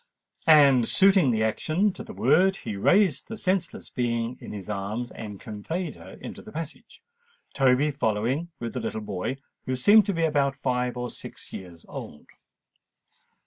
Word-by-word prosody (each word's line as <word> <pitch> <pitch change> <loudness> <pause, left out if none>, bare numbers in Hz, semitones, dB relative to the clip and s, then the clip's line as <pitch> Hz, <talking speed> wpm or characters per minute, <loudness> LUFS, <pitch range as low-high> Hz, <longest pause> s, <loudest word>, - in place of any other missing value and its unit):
And, 140 -6 +7
suiting 195 -7 +5
the 110 -2 +1
action 160 - +1
to - - -8
the - - -10
word, 190 +2 +3
he 105 - -5
raised 180 - +3
the 225 - -6
senseless 185 -4 -2
being 120 -1 -1
in - - -8
his 100 -3 -7
arms, 105 +4 -3
and 105 -3 -8
conveyed 155 - -5
her - - -12
into - - -8
the - - -12
passage, 160 -1 -8 0.5
Toby 135 +2 +3
following 130 +5 -1
with 115 -1 -4
the - - -2
little 110 - -3
boy, 105 +5 -3 0.3
who 130 - 0
seemed 205 +12 +6
to 200 - +1
be 165 - 0
about 140 -3 +2
five 125 -2 -1
or 125 0 -3
six - - -10
years 85 -3 -9
old. 75 - -9
130 Hz, 165 wpm, -26 LUFS, 110-165 Hz, 0.5 s, And